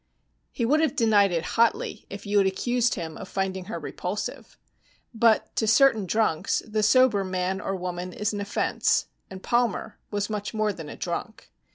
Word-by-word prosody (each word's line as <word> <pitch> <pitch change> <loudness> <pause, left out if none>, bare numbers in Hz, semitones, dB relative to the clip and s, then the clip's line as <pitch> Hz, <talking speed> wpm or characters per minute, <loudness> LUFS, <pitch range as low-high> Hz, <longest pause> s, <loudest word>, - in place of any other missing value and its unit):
He 235 - -1
would 295 +6 +3
have 315 -5 +1
denied 210 -4 +4
it 165 -2 -1
hotly 230 0 0
if 200 +1 -8
you 205 0 +2
had 195 - +3
accused 240 +5 0
him 165 -4 -5
of 190 - -9
finding 190 -1 -2
her 185 - -5
repulsive. 180 +6 -5 0.6
But 225 -1 +2
to 220 - +1
certain 225 -3 +4
drunks, 215 -6 +1
the 215 0 -1
sober 215 -1 +4
man 185 +1 -2
or 195 - -2
woman 180 0 -4
is 210 +3 -2
an 205 - -3
offense, 200 - +1 0.2
and 190 0 -10
Palmer 240 -4 0
was 205 -1 -2
much 210 0 -4
more 215 -1 +1
than 160 -5 -8
a - - -7
drunk. 185 +6 -5
205 Hz, 180 wpm, -26 LUFS, 190-225 Hz, 0.6 s, denied